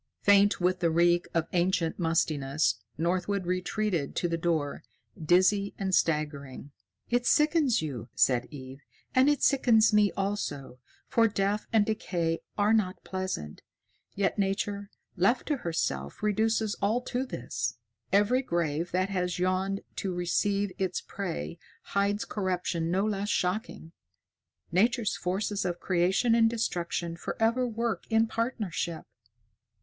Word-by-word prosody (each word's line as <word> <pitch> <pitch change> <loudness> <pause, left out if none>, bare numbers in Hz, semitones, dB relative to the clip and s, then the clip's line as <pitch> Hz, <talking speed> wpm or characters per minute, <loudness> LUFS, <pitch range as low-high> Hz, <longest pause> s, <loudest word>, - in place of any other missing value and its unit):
Faint 200 0 +5
with 180 +1 +1
the 170 -2 +2
reek 175 +2 +3
of 165 -1 0
ancient 175 -1 +1
mustiness, 145 - +1 0.2
Northwood 180 +4 -1
retreated 180 -3 -1
to 175 - 0
the 165 - -1
door, 165 -4 -1 0.4
dizzy 190 +5 +3
and 190 -2 -2
staggering. 145 -4 -1 0.4
"It 245 0 +1
sickens 300 - +3
you," 125 -6 -5
said 125 -2 +3
Eve, 135 -1 -10 0.3
"and 260 +2 +5
it 295 - +1
sickens 235 -5 +4
me 210 -1 +4
also, 155 -10 -3 0.3
for 230 -3 +3
death 205 0 -1
and 220 -2 +4
decay 175 -6 -1 0.2
are 210 +1 +3
not 195 -4 0
pleasant. 185 - -4 0.5
Yet 200 +1 0
Nature, 200 +1 -1 0.3
left 205 +8 +2
to 295 - +1
herself, 160 - -3
reduces 220 0 +1
all 215 +5 +1
to 250 +1 -2
this. 120 - -4 0.3
Every 205 +7 +3
grave 170 - -1
that 185 +1 +1
has 180 -2 -1
yawned 185 +2 0 0.2
to 195 - -2
receive 200 +3 0
its 185 -2 -1
prey 175 -3 -5 0.2
hides 200 +1 0
corruption 180 -4 -2
no 190 +4 +1
less 205 -1 -2
shocking. 185 -4 -2 0.8
Nature's 225 +5 +2
forces 200 +2 -2
of 175 -1 -2
creation 190 +6 +2
and 225 -1 +5
destruction 175 -6 -2
forever 230 +8 0
work 230 -4 -2
in 225 0 +4
partnership. 215 -8 -3
190 Hz, 130 wpm, -28 LUFS, 170-215 Hz, 0.8 s, Faint